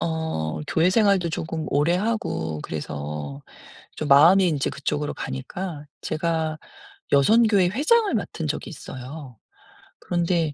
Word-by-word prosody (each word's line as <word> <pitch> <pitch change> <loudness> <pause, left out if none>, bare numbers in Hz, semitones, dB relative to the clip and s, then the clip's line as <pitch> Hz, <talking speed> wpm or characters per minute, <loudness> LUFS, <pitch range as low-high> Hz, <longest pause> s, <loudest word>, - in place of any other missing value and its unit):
어 160 - -2
교회 165 +3 +2
생활도 200 -5 +3
쪼금 160 0 -4
오래하고 150 - 0
그래서 75 -1 -5 0.6
좀 155 - -3
마음이 165 +7 +7
인제 145 -4 0
그쪽으로 145 +2 -3
가니까 145 +4 -6 0.2
제가 160 -1 -1 0.5
여선교회 205 +5 +5
회장을 360 - +2
맡은 170 -7 -3
적이 155 - -3
있어요. 130 - -9 0.6
그런데 170 -3 0
160 Hz, 270 characters per minute, -24 LUFS, 135-180 Hz, 0.6 s, 마음이